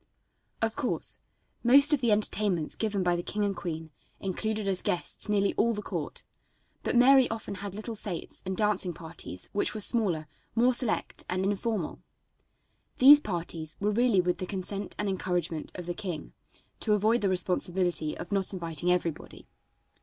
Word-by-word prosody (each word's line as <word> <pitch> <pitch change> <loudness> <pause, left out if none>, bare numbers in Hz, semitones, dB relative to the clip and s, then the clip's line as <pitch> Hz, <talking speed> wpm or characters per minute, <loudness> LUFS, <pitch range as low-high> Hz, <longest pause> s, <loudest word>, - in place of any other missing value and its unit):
Of 225 0 0
course 250 - -2 0.4
most 280 +5 +7
of 285 - +2
the 235 -3 +2
entertainments 205 -5 +1
given 205 -3 -1
by 175 -1 +2
the 175 - -2
king 205 +3 -2
and 200 -1 -1
queen 160 -2 -5 0.3
included 210 +2 -2
as 190 -2 +1
guests 180 +4 -1
nearly 200 -1 +2
all 230 0 +2
the 210 - -5
court, - - -5 0.6
but - - -2
Mary 260 +1 +6
often 225 -2 -5
had 200 -1 -6
little 215 +2 -5
fêtes 195 -5 -5
and 190 0 -4
dancing 200 -5 +1
parties 160 - -7
which 205 - 0
were - - -3
smaller, 195 -8 +2 0.3
more 245 +2 +4
select 240 -2 +1
and 185 +1 -1
informal. 205 -2 -2 1.0
These 290 +3 +9
parties 165 - -1
were 205 +1 +1
really 230 -3 +3
with 180 0 -1
the 185 - -4
consent 195 +1 -4
and 210 - -2
encouragement 180 -4 -2
of 180 - -6
the 175 - -3
king, 175 -6 -6 0.5
to 215 - +3
avoid 220 +3 +2
the 200 - +1
responsibility 180 -3 +1
of 170 - -8
not 195 -1 0
inviting 170 -1 -1
everybody. 170 -3 -3
195 Hz, 165 wpm, -28 LUFS, 175-215 Hz, 1.0 s, These